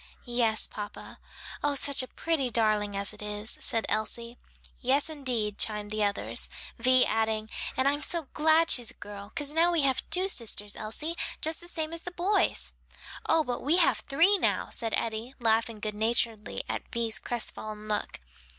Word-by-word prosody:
"Yes, 235 -3 +2
papa. 205 -1 -8 0.4
Oh 290 -1 +2
such 280 0 +4
a 255 - -5
pretty 310 -5 -1
darling 215 -3 +1
as 200 +1 -1
it 210 - -7
is!" 210 +1 -3
said 225 -1 +1
Elsie. 235 +2 -3 0.4
"Yes, 275 +5 +2
indeed," 245 -8 -2
chimed 210 -1 0
in 215 - -2
the - - +3
others; 205 0 0 0.3
Vi 255 +2 +5
adding, 220 -1 0 0.3
"and 260 - +3
I'm 290 +1 +1
so 335 +2 +1
glad 320 +2 +4
she's 240 -3 +3
a - - -9
girl: 200 0 -9
'cause 290 -1 -2
now 335 +2 +4
we 335 -3 +2
have 270 -2 +2
two 365 +3 +2
sisters, 210 - 0
Elsie, 300 +10 -3 0.2
just 315 +1 0
the 345 - -11
same 320 -2 -2
as 335 - -4
the 355 - -5
boys." 360 +4 +1 0.6
"Oh, 320 - +4
but 245 -3 -3
we 305 +6 +2
have 290 -11 +4
three 330 - +4
now!" - - 0
said 225 -2 -1
Eddie, 230 +3 -3
laughing 225 -1 +1
good 210 0 -3
naturedly 220 0 -1
at - - -5
Vi's 230 -2 +1
crestfallen 215 -2 -4
look. 210 -1 -2
235 Hz, 180 wpm, -29 LUFS, 215-295 Hz, 0.6 s, Vi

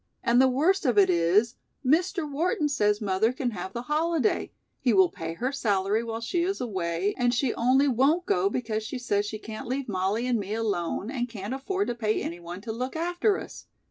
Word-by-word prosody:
"And 240 +2 +4
the 265 - +6
worst 325 +10 +2
of 240 -4 +2
it 190 -2 +6
is, 180 +8 +2 0.3
Mr. 340 +4 +2
Wharton 310 +4 0
says 210 -6 +1
mother 205 +3 +2
can 255 -1 -2
have 190 -2 -6
the 235 +4 -5
holiday, 310 -1 0 0.3
he 245 -4 +2
will 190 -3 +5
pay 165 0 -5
her 250 +8 -2
salary 210 -4 0
while 225 0 -4
she 340 +9 -1
is 385 +3 -1
away, 190 -5 -1
and 245 0 +3
she 240 0 +1
only 260 +4 +3
won't 280 +8 +2
go 190 - +2
because 220 -1 -2
she 220 +5 -5
says 205 -4 0
she 215 - -4
can't 220 +3 -8
leave 265 +2 -2
Mollie 200 +3 -1
and 245 -3 +1
me 205 +1 -3
alone 205 -1 -2
and 245 -3 -2
can't 210 +1 -5
afford 380 +9 -2
to - - 0
pay 220 -2 0
any 170 +1 -5
one 175 +2 -8
to 225 +1 -5
look 250 +5 -4
after 350 +5 +1
us. - - -10
235 Hz, 210 wpm, -27 LUFS, 205-275 Hz, 0.3 s, the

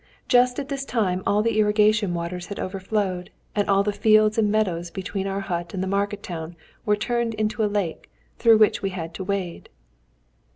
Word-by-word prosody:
Just 250 0 +4
at 280 - -3
this 275 -1 -3
time 195 -8 0
all 210 +1 +3
the 225 -1 +1
irrigation 210 -2 +3
waters 175 +1 -4
had 200 - -6
overflowed, 190 -1 -2 0.3
and 205 -1 0
all 195 0 +4
the 210 - 0
fields 215 +1 +4
and 210 -2 +2
meadows 180 -6 0
between 190 +2 -4
our 195 0 -2
hut 175 -1 -4
and 185 - -2
the - - -2
market 200 +1 -1
town 165 -1 -6 0.3
were 210 - +4
turned 235 +1 -1
into 215 +1 -1
a 210 - +2
lake, 200 -6 -3 0.3
through 230 -2 +6
which 215 -1 +3
we 195 - -1
had 170 -3 -6
to 190 - -5
wade." 185 -3 -4
200 Hz, 195 wpm, -24 LUFS, 185-215 Hz, 0.3 s, through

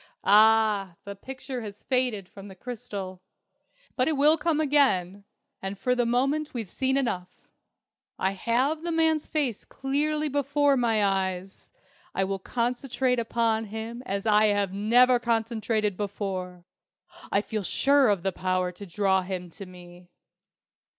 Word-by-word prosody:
Ah, 210 -3 +4
the 200 0 -7
picture 260 +3 -7
has 210 -2 -9
faded 250 -7 0
from 195 +1 -12
the 190 - -11
crystal! 195 -4 -7 0.7
But 255 - +1
it 320 - +2
will 300 +3 +6
come 325 -1 0
again. 205 - +2 0.4
And 195 +1 -5
for 250 +6 0
the 245 -1 +1
moment 275 +5 0
we've 225 -6 -4
seen 265 0 0
enough. 185 -9 -4 0.7
I 190 - 0
have 245 +10 0
the 340 0 -3
man's 320 -2 +1
face 280 -9 -1
clearly 300 +3 -1
before 285 0 +2
my 225 -4 +2
eyes. 190 -1 -2 0.5
I 195 - +1
will 195 0 -2
concentrate 250 +3 -1
upon 225 -1 0
him 220 +3 -6
as 195 +2 -3
I 215 0 +4
have 205 -2 +1
never 240 +5 +4
concentrated 225 -3 -1
before! 190 -3 -5 0.7
I 200 - +2
feel 215 0 -4
sure 275 +6 +3
of 195 -4 0
the 195 - 0
power 185 0 -1
to 195 +3 -11
draw 190 +1 +1
him 180 -2 -6
to 195 +3 -9
me." 175 -1 -14
220 Hz, 145 wpm, -26 LUFS, 195-260 Hz, 0.7 s, will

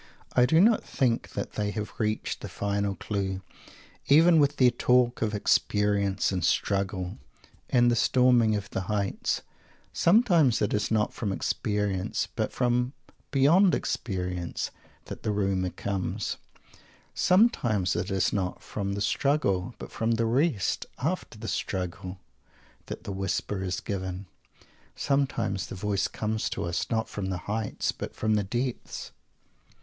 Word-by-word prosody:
I 125 0 +5
do 160 +3 +4
not 220 +4 +5
think 120 -3 0
that - - -4
they 105 -1 -1
have 105 0 -4
reached 110 -1 -1
the - - -6
final 100 -1 -1
clue, 95 0 -3 0.6
even 160 +3 +6
with 145 0 +2
their 125 -2 +6
talk 125 0 +2
of 110 -1 0
"experience" 100 -1 +2
and 90 -2 -2
"struggle" 95 0 0 0.5
and 120 -1 +4
the - - +2
"storming 120 -2 +4
of 100 -1 -3
the - - -2
heights." 100 -2 -1 0.5
Sometimes 170 - +4
it 105 - 0
is 105 0 0
not 110 -1 +1
from 105 -4 -2
"experience," 100 -1 -1
but - - -1
from 125 +1 +1 0.4
beyond 165 +8 +5
experience, 90 -4 -3 0.3
that - - -8
the - - -2
rumour 95 -3 0
comes. 95 0 -3 0.8
Sometimes 120 - +3
it 90 +2 -2
is 95 -2 +1
not 95 -3 -2
from 100 -1 -3
the 100 - -3
"struggle," 120 -5 +1
but - - -9
from 115 +1 0
the 115 0 +1
"rest" 120 - +1
after 155 -4 -3
the 110 +1 -7
struggle, 90 -1 -3 0.7
that - - -6
the - - -5
whisper 95 +1 -2
is 90 -1 -2
given. 95 -1 -4 0.7
Sometimes 135 -9 0
the - - -7
voice 100 +1 0
comes 110 0 -2
to - - -3
us, 85 0 -2
not 110 0 0
from 100 -2 -4
the 95 -1 -2
"heights," 110 0 -1
but - - -7
from 110 0 +1
the 105 -1 +2
depths. 120 +5 -4
105 Hz, 145 wpm, -27 LUFS, 95-125 Hz, 0.8 s, even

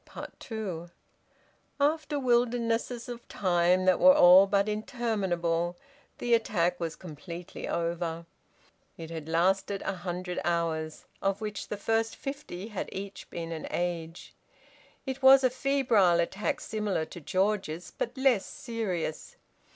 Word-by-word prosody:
TWO. 190 -7 -5 0.9
After 300 0 +1
wildernesses 240 -1 +1
of 240 -1 -8
time 180 -1 +2
that 185 -1 +4
were 275 0 +8
all 185 -4 +8
but 200 +1 +2
interminable, 190 -7 -1 0.4
the 240 -1 0
attack 180 -6 +2
was 165 -2 -3
completely 170 +1 -8
over. 170 0 -2 0.7
It 165 0 -8
had 160 -1 -6
lasted 195 +4 +1
a 195 - -2
hundred 180 0 -4
hours, 160 -2 -1 0.2
of 195 0 0
which 210 -2 -5
the 210 - -4
first 225 +2 0
fifty 275 -9 -6
had 210 - -4
each 195 0 -7
been 170 -1 -5
an 160 -1 -5
age. 170 -1 -4 0.7
It 265 0 -4
was 265 0 +8
a 255 - +4
febrile 250 -10 +3
attack 190 +4 -1
similar 210 -7 -2
to 175 - -10
George's, 185 -1 -1
but 240 +3 -3
less 260 -6 +3
serious. 200 -10 -4
195 Hz, 130 wpm, -29 LUFS, 170-230 Hz, 0.9 s, were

